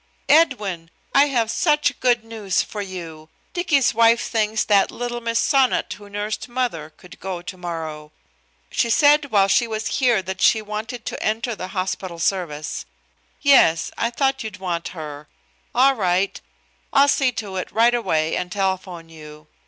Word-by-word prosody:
"Edwin, 210 - +2 0.2
I 280 +1 +5
have 235 -5 0
such 295 0 +1
good 240 -3 +2
news 215 -4 -1
for 210 - -6
you. 165 -5 -8 0.2
Dicky's 335 -9 +2
wife 230 +1 +4
thinks 220 -1 0
that 200 -2 +3
little 240 0 -5
Miss 230 0 0
Sonnot 265 -7 +2
who 205 +1 -13
nursed 210 +3 -4
mother 240 -12 -2
could 180 - -15
go 185 -2 -5
tomorrow. 165 -4 -6 0.6
She 235 - +1
said 290 +5 +5
while 200 -3 +4
she 235 +5 +3
was 220 -1 -3
here 240 -7 +3
that 190 +1 -6
she 220 - +5
wanted 215 +3 -6
to - - -5
enter 225 +2 -1
the 185 - -6
hospital 185 -1 -3
service. 165 -4 -2 0.6
Yes. 255 - +5
I 230 - 0
thought 270 +2 0
you'd 215 -2 -7
want 175 -3 -3
her. 150 -1 -8 0.5
All 270 +2 +5
right. 190 -4 0 0.5
I'll 275 +1 +5
see 270 -2 +2
to 210 -6 -5
it 185 - -4
right 235 +2 +4
away 160 -9 0
and 180 0 -3
telephone 190 -3 -2
you. 155 -1 -13
210 Hz, 160 wpm, -22 LUFS, 180-240 Hz, 0.6 s, I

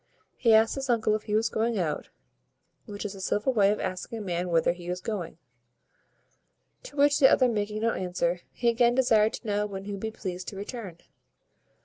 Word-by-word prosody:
He 230 -3 +4
asked 220 0 +4
his 270 -1 -4
uncle 225 -3 +2
if 215 - 0
he 210 - +1
was 225 +1 +2
going 225 +1 -1
out, 160 -5 -2 0.8
which 205 0 -6
is 205 - -4
a 195 - -9
civil 210 +7 0
way 200 -4 +4
of 210 - -2
asking 185 +5 -4
a - - -5
man 180 -2 -2
whither 165 0 +2
he 175 0 -11
is 180 +1 -2
going: 180 -5 -5 1.4
to - - -12
which 290 0 +4
the 265 - +7
other 255 - +4
making 215 -1 -2
no 230 - +3
answer, 180 -2 -1
he 240 - -2
again 235 +1 +3
desired 225 -4 +3
to - - -7
know 210 -1 0
when 195 -1 -7
he 205 - -6
would 200 -1 -5
be 220 - -2
pleased 185 -4 -6
to - - -6
return? 200 -3 -7
210 Hz, 210 wpm, -27 LUFS, 185-230 Hz, 1.4 s, the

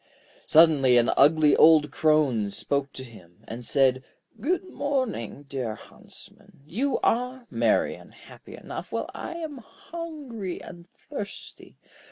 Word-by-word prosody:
Suddenly 150 -6 +5
an 120 - +3
ugly 150 +1 +5
old 155 -3 +6
Crone 145 -10 +2
spoke 140 +6 -3
to 130 - -7
him, 105 -5 -16
and 120 +2 -7
said: 130 0 +2 0.4
'Good 345 - -1
morning, 260 - -3
dear 130 -6 -4
Huntsman; - - -16
you 250 - -1
are 250 +1 0
merry - - +1
and - - -14
happy - - -14
enough, - - -8
while - - -3
I 340 - -7
am 315 -5 -6
hungry 270 - -8
and 170 -1 -12 0.2
thirsty. 210 -9 -9
155 Hz, 130 wpm, -26 LUFS, -, 0.4 s, old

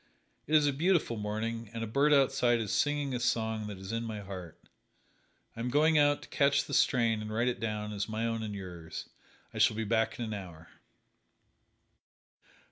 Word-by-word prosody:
It 155 - +2
is 150 -1 +6
a 145 - +2
beautiful 165 -4 +1
morning 110 +1 -3
and 115 - -3
a - - -1
bird 140 +7 +2
outside 135 -4 +3
is 110 -3 -2
singing 145 -2 +1
a 125 - -1
song 110 -3 0
that 105 -2 -6
is 95 +2 -7
in 115 0 -1
my 110 -2 -5
heart. 95 -4 -8 1.0
I - - -10
am 120 +2 -2
going 155 +3 +4
out 145 0 +3
to - - -12
catch 140 0 +3
the - - -7
strain 115 -5 +3
and 110 0 -6
write 115 +3 0
it 125 - -1
down 105 -1 -3
as 100 +1 -3
my 110 +1 -2
own 115 -1 -1
and 105 -2 -4
yours. 85 -4 -7 0.5
I - - -5
shall - - +4
be 110 - -1
back 110 +1 0
in 120 - -3
an 110 - -4
hour." 85 -5 -9
115 Hz, 200 wpm, -31 LUFS, 105-135 Hz, 1.0 s, is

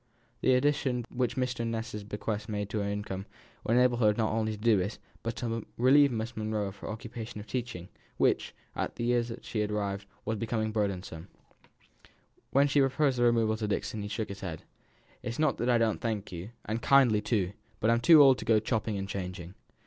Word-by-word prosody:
The 130 - +4
addition 130 -3 +1
which 125 0 0
Mr. 125 -2 -1
Ness's 115 -2 -3
bequest 105 +1 -4
made 105 -1 -3
to 110 - -1
her 100 0 -1
income 100 -1 -4 0.4
would 115 - +1
enable 125 -1 +4
her 115 -3 +3
to 105 - +5
do - - -14
not 110 -2 +1
only 110 -1 0
this, 105 -2 +1 0.2
but 115 0 -3
to 115 -3 -3
relieve 140 +3 +6
Miss 115 0 -3
Monro 110 -1 -1
of 100 +1 -8
her - - -7
occupation 110 0 -6
of 105 - -8
teaching; 120 -8 -4 0.3
which, - - +1 0.2
at - - -3
the - - -4
years 120 0 +1
she 110 - -3
had 105 -1 0
arrived 100 -1 -2
at, - - -33
was 110 - -1
becoming 110 -1 -1
burdensome. 95 -5 -3 1.2
When 140 +1 +4
she 145 +1 +2
proposed 135 -1 +2
the - - +3
removal 115 -2 +3
to 110 -1 -2
Dixon 105 +1 -2
he 100 - -4
shook 110 +1 -3
his 100 0 -7
head. 85 -5 -5 0.6
"It's 120 -1 -4
not 155 0 +1
that 120 - 0
I 120 - +5
don't 115 -2 +1
thank 110 -3 -2
you, 90 +3 -6 0.2
and 110 +2 -2
kindly, 125 -6 +5
too; 105 -4 0 0.3
but 110 - +3
I'm 115 0 +2
too 155 +3 +8
old 135 -2 +6
to - - -6
go 110 -2 +4
chopping 110 -1 -1
and 95 0 -3
changing." 90 -2 -5
110 Hz, 210 wpm, -30 LUFS, 105-120 Hz, 1.2 s, too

